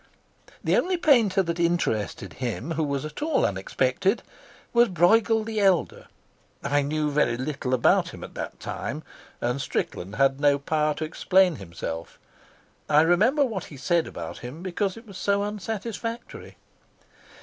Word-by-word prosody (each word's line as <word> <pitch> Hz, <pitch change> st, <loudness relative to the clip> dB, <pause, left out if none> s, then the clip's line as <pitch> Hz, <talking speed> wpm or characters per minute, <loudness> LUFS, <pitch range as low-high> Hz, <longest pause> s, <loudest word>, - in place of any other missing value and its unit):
The -, -, +2 dB
only 370 Hz, 0 st, +1 dB
painter 230 Hz, -, +4 dB
that 170 Hz, -1 st, -3 dB
interested 110 Hz, -, 0 dB
him 125 Hz, +5 st, -3 dB
who 160 Hz, -, -1 dB
was 140 Hz, -1 st, -2 dB
at 155 Hz, -, -7 dB
all 310 Hz, -1 st, +2 dB
unexpected 130 Hz, -, 0 dB, 0.5 s
was 240 Hz, 0 st, +5 dB
Brueghel 220 Hz, +5 st, +4 dB
the 220 Hz, -1 st, -2 dB
Elder. 190 Hz, -4 st, +2 dB, 0.6 s
I 145 Hz, +1 st, +2 dB
knew 150 Hz, +1 st, -1 dB
very 145 Hz, -5 st, +2 dB
little 135 Hz, 0 st, -3 dB
about 120 Hz, -, +3 dB
him -, -, -10 dB
at -, -, -9 dB
that -, -, -6 dB
time, -, -, -5 dB, 0.4 s
and 125 Hz, +3 st, -1 dB
Strickland 100 Hz, -6 st, -3 dB
had 135 Hz, +2 st, +3 dB
no 145 Hz, -1 st, +4 dB
power 150 Hz, +1 st, 0 dB
to 155 Hz, -, -3 dB
explain 180 Hz, +1 st, +3 dB
himself. 85 Hz, -2 st, -6 dB, 0.7 s
I 150 Hz, 0 st, +6 dB
remember 215 Hz, -, +4 dB
what 215 Hz, -8 st, -4 dB
he 145 Hz, -, -11 dB
said 170 Hz, +4 st, +1 dB
about 80 Hz, -1 st, -7 dB
him 130 Hz, +8 st, -8 dB
because 190 Hz, +2 st, -2 dB
it 225 Hz, -, -12 dB
was 200 Hz, -3 st, -10 dB
so 200 Hz, 0 st, +1 dB
unsatisfactory. 225 Hz, +3 st, -5 dB
165 Hz, 150 wpm, -26 LUFS, 140-205 Hz, 0.7 s, I